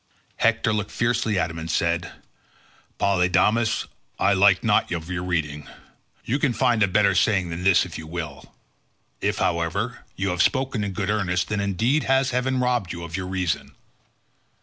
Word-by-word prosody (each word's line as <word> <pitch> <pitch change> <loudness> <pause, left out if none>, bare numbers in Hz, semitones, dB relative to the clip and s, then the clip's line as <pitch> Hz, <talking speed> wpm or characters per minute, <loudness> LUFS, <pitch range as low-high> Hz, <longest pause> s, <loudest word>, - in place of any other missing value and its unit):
Hector 115 0 +2
looked 105 -1 -2
fiercely 115 -3 0
at 85 -2 0
him 80 - -7
and 80 0 -6
said, 85 +2 0 0.9
"Polydamas, 100 +4 +2 0.3
I - - +3
like - - +4
not - - +2
of 85 0 -4
your 90 0 -2
reading. 75 -5 -2 0.6
You 135 +5 0
can 140 -4 +1
find 120 -3 +2
a 100 - +5
better 100 +1 +3
saying 95 -1 +2
than 85 +2 -5
this 95 -1 +4
if - - -8
you 80 - -9
will. 80 -4 -7 0.7
If, - - 0
however, 100 +9 -1 0.2
you 95 0 -1
have 90 -1 0
spoken 130 -5 +1
in 100 -1 -3
good 105 0 -1
earnest, 90 -4 0
then 110 - -1
indeed 115 - +1
has 135 0 +2
heaven 130 +1 0
robbed 125 -7 0
you 85 -1 -6
of 85 -1 -6
your 95 -1 -4
reason. 95 -3 -2
95 Hz, 170 wpm, -24 LUFS, 85-115 Hz, 0.9 s, a